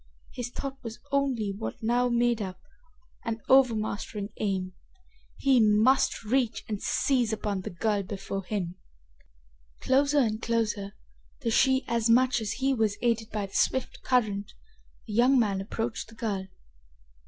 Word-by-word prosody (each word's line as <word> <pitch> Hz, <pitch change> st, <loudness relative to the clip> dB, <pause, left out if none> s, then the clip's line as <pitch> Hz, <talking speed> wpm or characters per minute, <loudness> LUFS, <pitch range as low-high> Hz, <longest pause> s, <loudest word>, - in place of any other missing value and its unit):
His 245 Hz, -1 st, -4 dB
thought 270 Hz, +2 st, -6 dB
was 230 Hz, -1 st, -7 dB
only 265 Hz, -7 st, +1 dB
what 225 Hz, -, -5 dB
now 245 Hz, +2 st, +2 dB
made 235 Hz, -1 st, +2 dB
up 185 Hz, -2 st, -5 dB, 0.6 s
an 225 Hz, -1 st, -3 dB
overmastering 215 Hz, -5 st, +2 dB
aim. 190 Hz, -3 st, -2 dB, 0.6 s
He 270 Hz, -2 st, +4 dB
must 220 Hz, +5 st, +3 dB
reach 240 Hz, +1 st, 0 dB
and 210 Hz, -2 st, -4 dB
seize 250 Hz, -5 st, +1 dB
upon 205 Hz, -3 st, -2 dB
the -, -, -5 dB
girl 205 Hz, +4 st, 0 dB
before 195 Hz, 0 st, -5 dB
him! 185 Hz, -2 st, -3 dB, 1.0 s
Closer 280 Hz, +2 st, +2 dB
and 225 Hz, -5 st, +2 dB
closer, 215 Hz, -4 st, -1 dB, 0.5 s
though 230 Hz, -, 0 dB
she 265 Hz, +3 st, +3 dB
as 235 Hz, -1 st, +1 dB
much 250 Hz, +1 st, +4 dB
as 210 Hz, -2 st, -2 dB
he 270 Hz, +1 st, +1 dB
was 220 Hz, -4 st, 0 dB
aided 230 Hz, -2 st, +1 dB
by 210 Hz, -2 st, -2 dB
the 195 Hz, -, -14 dB
swift 260 Hz, -, 0 dB
current, 210 Hz, -6 st, 0 dB, 0.5 s
the 215 Hz, -, -7 dB
young 250 Hz, +5 st, +5 dB
man 200 Hz, -5 st, +1 dB
approached 225 Hz, +3 st, -4 dB
the 225 Hz, -, -15 dB
girl. 200 Hz, -4 st, -3 dB
225 Hz, 145 wpm, -28 LUFS, 205-250 Hz, 1.0 s, young